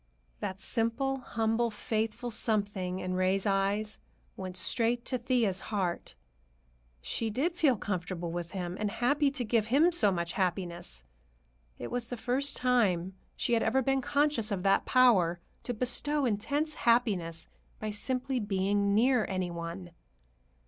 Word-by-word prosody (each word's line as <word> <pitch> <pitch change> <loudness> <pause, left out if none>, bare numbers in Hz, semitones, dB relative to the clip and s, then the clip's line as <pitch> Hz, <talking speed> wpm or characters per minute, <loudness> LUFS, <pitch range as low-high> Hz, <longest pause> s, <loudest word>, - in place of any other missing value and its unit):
That 195 -2 -4
simple, 235 +6 -1
humble, 230 -1 0
faithful 220 +2 -2
something 200 -5 -1
in 185 -1 -3
Ray's 185 +2 +1
eyes 200 +2 0 0.4
went 185 -1 -5
straight 235 +3 +1
to 255 - -1
Thea's 235 -6 +1
heart. 190 -5 -2 0.9
She 225 - -2
did 280 - 0
feel 290 -8 +3
comfortable 180 -3 -3
with 170 0 -4
him, 180 -2 -3
and 210 -1 0
happy 275 +7 +2
to 275 -2 -2
give 220 -1 +1
him 295 +9 +4
so 220 - +4
much 170 -2 -2
happiness. 175 - -2 0.7
It 120 - -6
was 245 -1 -2
the 245 - -4
first 255 +5 0
time 195 -8 +2 0.2
she 240 - -1
had 230 - +3
ever 260 +4 +2
been 270 +1 +1
conscious 280 -5 +1
of 190 -3 -2
that 195 0 +3
power 195 -10 +4 0.2
to - - -3
bestow 260 +5 0
intense 280 +8 0
happiness 195 - +1 0.3
by 215 0 -3
simply 255 +4 -2
being 200 -1 +1
near 245 0 +3
any 185 -2 -2
one. 170 +1 -6
215 Hz, 145 wpm, -30 LUFS, 185-250 Hz, 0.9 s, him